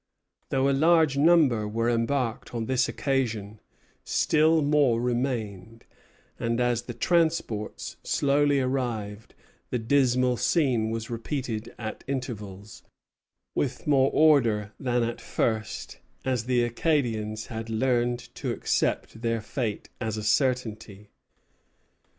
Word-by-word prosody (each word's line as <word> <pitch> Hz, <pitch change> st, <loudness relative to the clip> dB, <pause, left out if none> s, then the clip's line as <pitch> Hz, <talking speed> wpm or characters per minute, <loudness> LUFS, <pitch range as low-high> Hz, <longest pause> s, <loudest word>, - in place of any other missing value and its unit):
Though 135 Hz, 0 st, +2 dB
a 140 Hz, -, +3 dB
large 160 Hz, 0 st, +4 dB
number 140 Hz, -8 st, +4 dB
were 115 Hz, +2 st, -1 dB
embarked 120 Hz, 0 st, -1 dB
on 115 Hz, -1 st, -2 dB
this 130 Hz, +1 st, +1 dB
occasion, 110 Hz, -7 st, -2 dB, 0.4 s
still 160 Hz, 0 st, +3 dB
more 145 Hz, -5 st, +3 dB
remained; 115 Hz, -4 st, -3 dB, 0.5 s
and 115 Hz, +1 st, -1 dB
as 120 Hz, -1 st, +1 dB
the 120 Hz, -1 st, -8 dB
transports 160 Hz, -9 st, 0 dB
slowly 145 Hz, 0 st, +2 dB
arrived, 115 Hz, -5 st, -3 dB, 0.3 s
the -, -, -1 dB
dismal 125 Hz, 0 st, +2 dB
scene 125 Hz, -10 st, +1 dB
was 115 Hz, +1 st, -4 dB
repeated 115 Hz, -2 st, -4 dB
at 110 Hz, -2 st, -6 dB
intervals, 105 Hz, -7 st, -6 dB, 0.7 s
with 130 Hz, -2 st, -2 dB
more 135 Hz, -2 st, +4 dB
order 115 Hz, -10 st, +3 dB
than 125 Hz, -2 st, 0 dB
at 115 Hz, 0 st, -3 dB
first, 110 Hz, -1 st, -2 dB, 0.3 s
as 125 Hz, -4 st, 0 dB
the 125 Hz, -1 st, +2 dB
Acadians 115 Hz, -5 st, -1 dB
had 115 Hz, 0 st, -6 dB
learned 120 Hz, +1 st, +1 dB, 0.2 s
to -, -, -4 dB
accept 115 Hz, -, -1 dB
their 115 Hz, -1 st, 0 dB
fate 110 Hz, -1 st, -4 dB
as 110 Hz, -2 st, -3 dB
a 105 Hz, -, -4 dB
certainty. 110 Hz, -4 st, -1 dB
120 Hz, 115 wpm, -26 LUFS, 110-135 Hz, 0.7 s, large